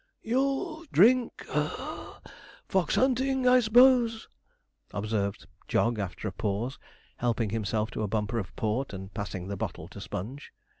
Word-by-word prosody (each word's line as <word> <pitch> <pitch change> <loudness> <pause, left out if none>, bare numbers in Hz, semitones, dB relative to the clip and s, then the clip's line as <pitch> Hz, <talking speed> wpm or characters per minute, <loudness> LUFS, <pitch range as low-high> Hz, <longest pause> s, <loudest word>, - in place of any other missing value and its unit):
'You'll 275 +7 0
drink 240 +6 +4
(puff) - - -4 0.5
fox 190 -2 +1
hunting, 260 0 +2
I 250 0 +7
s'pose,' 240 0 +5 0.7
observed 100 -1 -2 0.2
Jog 115 -2 +1
after 100 +2 -4
a - - -2
pause, 105 +6 -2 0.4
helping 115 -3 0
himself 110 0 -1
to - - -4
a 105 - 0
bumper 105 +2 -1
of 95 - -7
port 110 +3 -1
and 95 0 -7
passing 95 -3 -4
the 100 0 -4
bottle - - -4
to - - -10
Sponge. 125 +10 -6
115 Hz, 140 wpm, -28 LUFS, -, 0.7 s, I